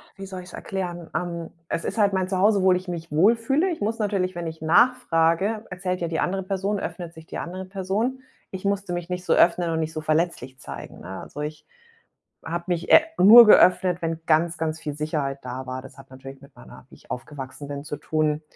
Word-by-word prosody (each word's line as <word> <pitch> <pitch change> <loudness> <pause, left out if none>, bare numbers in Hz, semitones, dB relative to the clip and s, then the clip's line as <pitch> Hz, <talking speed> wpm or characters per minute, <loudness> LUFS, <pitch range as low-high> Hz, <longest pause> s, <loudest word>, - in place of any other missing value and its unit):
wie 195 - -8
soll 190 -1 -7
ich's 180 - -14
erklären? 175 -3 -5
Ähm, 170 -2 -3 0.2
es 165 - -2
ist 200 - -4
halt 200 -2 +3
mein 185 -1 0
Zuhause, 200 +2 +3
wohl 185 -1 +5
ich 185 0 -9
mich 165 -2 -6
wohlfühle. 230 - +3
Ich 315 - -5
muss 225 +3 -1
natürlich 190 -3 -1
wenn 170 -1 -4
ich 160 -1 -8
nachfrage, 190 +1 +2
erzählt 180 0 -3
ja 170 - -1
die 160 - -2
andere 190 +1 -1
Person, 195 +1 -2
öffnet 170 -4 -6
sich 160 -1 -13
die - - -7
andere 185 +2 -6
Person. 200 +7 -2 0.3
Ich 190 +1 -7
musste 200 -2 -1
mich 175 0 -4
nicht 180 0 -4
so - - +3
öffnen 175 0 +3
und 160 - -1
nicht 160 0 -3
so 155 - -4
verletzlich 155 -5 -1
zeigen, - - -9
ne? 95 +1 -7
Also, 150 - -8
ich 150 +1 -6 0.8
habe 170 +1 -4
mich 175 -2 -2
e - - +9 0.2
nur 225 +4 +10
geöffnet, 180 -3 +5
wenn 165 0 -2
ganz, 165 +1 +2
ganz 160 0 -3
viel 150 -3 -5
Sicherheit 150 -2 -2
da 130 +1 -6
war. 130 0 -5
Das 135 - -14
hat 135 -1 -15
natürlich 135 +1 -11
mit 140 0 -18
meiner - - -14
wie - - -16
ich - - -24
aufgewachsen 135 +2 -7
bin, 140 0 -6
zu 150 - -5
tun. 155 -1 -1
175 Hz, 215 wpm, -24 LUFS, 155-190 Hz, 0.8 s, nur